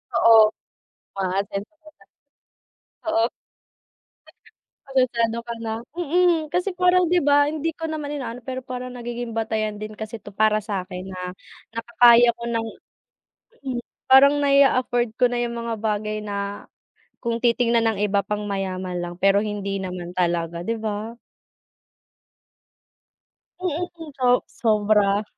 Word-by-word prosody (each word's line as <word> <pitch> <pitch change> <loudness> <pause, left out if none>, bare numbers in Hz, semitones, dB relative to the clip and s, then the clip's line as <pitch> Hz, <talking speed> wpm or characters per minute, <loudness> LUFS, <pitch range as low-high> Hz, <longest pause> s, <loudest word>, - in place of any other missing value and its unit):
Oo, 225 -1 +7 0.8
aasenso 195 +6 -2
ka 310 - -14
na. - - -22 1.1
Oo. 225 +1 +3 1.6
Asensado 235 -4 +1
ka 235 - -4
na. 220 -1 -2 0.2
Mm, 345 -1 +2
kasi 365 +3 +1
parang, 360 -1 +4
'di 355 0 +4
ba 290 0 +4
hindi 315 +1 -2
ko 325 0 -5
naman 295 -2 -4
inaano 245 -4 -5
pero 260 0 -4
parang 255 0 -6
nagiging 240 -1 -5
batayan 215 -2 -2
din 215 0 -7
kasi 220 0 -7
'to - - -10
para 215 0 +3
sakin, 190 -2 -5
ah, 180 0 -5 0.4
na 230 - -3
nakakaya 235 0 +6
ko 235 - -9
ng 230 -1 -1 1.4
parang 280 +2 +7
nai-a-afford 255 -4 +3
ko 250 - +5
na 245 - -3
yung 235 0 -3
mga 230 0 -3
bagay 215 0 -1
na 200 0 -5 0.5
kung 235 -1 -3
titignan 235 -1 +2
ng 215 - -2
iba 200 0 +1
pang 210 0 -4
mayaman 185 -2 -3
lang 175 0 -5
pero 195 +2 +4
hindi 200 -2 -3
naman 180 -1 -6
talaga, 170 -1 -1
'di 225 +5 -2
ba? 220 +2 -4 2.4
Mm, 355 0 -1 0.3
so 250 -1 +3
sobra 210 -2 +2
230 Hz, 130 wpm, -23 LUFS, 205-255 Hz, 2.4 s, Oo